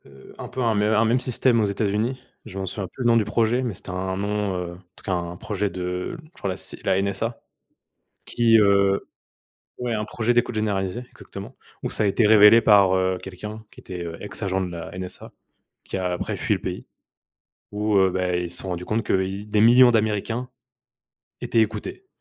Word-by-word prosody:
Heu, 65 -1 -15
un - - -7
peu 130 - -5
un - - +2
un - - 0
me 105 +1 +2
un 110 - +4
même 120 +3 +2
système 125 -1 +2
aux - - +3
États-Unis, 105 +5 -1 0.3
je 95 - -9
m'en 95 - -2
souviens 95 +1 -4
plus 130 - -7
le - - +2
nom 115 -1 +5
du 110 - +3
projet, 115 +3 +1
mais 120 -4 -2
c'était 90 - -9
un 95 +1 -3
nom, 100 -1 -1
heu, 90 -1 -4
en - - -12 0.2
tout - - -19
cas 95 - -2
un 85 0 -3
projet 105 +1 -2
de 90 - -4
je 155 - -19
crois 100 - -4
la 95 - -3
C - - -5
la - - +2
NSA. 110 +4 -2 0.9
Qui, 115 -1 +4
heu 100 -1 +3 0.7
ouais, 125 -1 -2
un 105 -1 -1
projet 115 +2 0
d'écoute 120 0 +1
généralisée, 105 +1 -1
exactement. - - -10 0.3
Où - - -2
ça - - 0
a - - +3
été 105 +3 +3
révélé 105 +1 +8
par, 100 -3 +5
heu, 95 0 +1
quelqu'un 105 +4 -8
qui - - -15
était, 90 -2 -7
heu, 85 -1 -6
ex-agent 95 -2 -2
de 90 - -4
la 85 +1 -7
NSA, 90 -1 -7 0.5
qui - - -6
a 90 -1 -1
après 90 - -3
fui - - 0
le - - -5
pays. - - -5 0.9
Où, 105 0 0
heu, 95 0 +5
bah, 90 -1 -1
ils 90 0 -2
se 90 - -5
sont 95 - -6
rendu 90 -1 -4
compte 110 +1 0
que 95 - +1
i 95 +2 -4
des 105 0 +1
millions 120 +3 +7
d'Américains 110 +2 0 0.9
étaient 115 - +2
écoutés. 110 - -3
105 Hz, 215 wpm, -23 LUFS, 95-115 Hz, 0.9 s, révélé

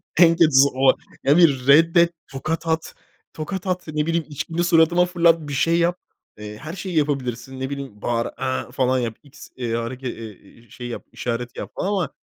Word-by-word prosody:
O - - -45
en 165 0 +6
kötüsü 145 -5 +5
o. 130 0 +4 0.3
Ya 140 +2 +4
bir 140 -7 +4
reddet. 165 +4 +5 0.2
Tokat 155 +5 -4
at. 160 0 -2 0.4
Tokat 180 +5 -5
at, 180 -1 -2
ne 150 0 -1
bileyim, 165 -1 0
içkini 165 +4 -3
suratıma 170 +1 +4
fırlat. 170 -2 +3
Bir - - -5
şey 165 +5 +2
yap. 175 +1 +1 0.4
Eee, 105 0 -8
her 155 +6 -8
şeyi 185 -2 -5
yapabilirsin. 130 -3 -2
Ne 130 +1 -3
bileyim, 135 -7 -7
bağır, 115 -1 0
"A!" 130 0 -3
falan 130 -1 +1
yap. 115 -3 -3
X, 145 0 -14
eee, 120 -3 -3
hareke 125 +3 -4
e - - -2
e 110 -2 -9
eee, 115 +3 -21
şey 120 +2 -8
yap, 120 - -7
işaret 120 0 -4
yap - - -6
falan 185 - -2
ama 190 -8 -1
145 Hz, 200 wpm, -22 LUFS, 125-165 Hz, 0.4 s, en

